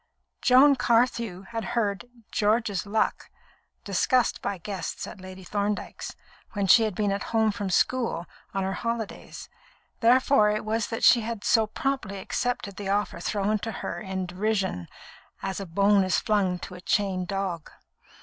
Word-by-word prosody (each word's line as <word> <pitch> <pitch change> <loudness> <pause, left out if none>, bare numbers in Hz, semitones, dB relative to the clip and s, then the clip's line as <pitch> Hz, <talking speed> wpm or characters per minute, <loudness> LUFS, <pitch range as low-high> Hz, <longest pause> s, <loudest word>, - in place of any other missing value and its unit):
Joan 270 +2 +6
Carthew 230 -6 +1
had 225 +3 -5
heard 205 -2 0 0.3
"George's 210 -2 +1
luck" 215 +2 0 0.5
discussed 255 -3 +1
by 200 - -2
guests 185 -1 -5
at 195 - -10
Lady 185 0 -10
Thorndyke's, 205 +2 -3 0.4
when 200 -1 0
she 195 +5 +7
had 210 -4 -3
been 205 0 0
at 200 - -2
home 220 -1 +4
from 205 -2 -4
school 230 -3 +1 0.3
on 195 -1 -1
her 190 0 -1
holidays; 230 -1 -5 0.5
therefore 250 -1 +5
it 215 0 -1
was 220 0 0
that 225 - -4
she 240 - +7
had 225 -1 -5
so 225 -2 +3
promptly 240 -4 -2
accepted 205 0 -3
the 200 -2 -4
offer 205 +1 0
thrown 210 +1 0
to 225 - -4
her - - -5
in 190 -2 -3
derision, 190 - -1 0.6
as 195 0 -3
a 195 - -6
bone 200 +3 +3
is 185 -1 +1
flung 195 -4 +1
to 180 - -9
a 180 - -10
chained 190 -2 0
dog. 190 -4 -3
205 Hz, 160 wpm, -26 LUFS, 190-225 Hz, 0.6 s, she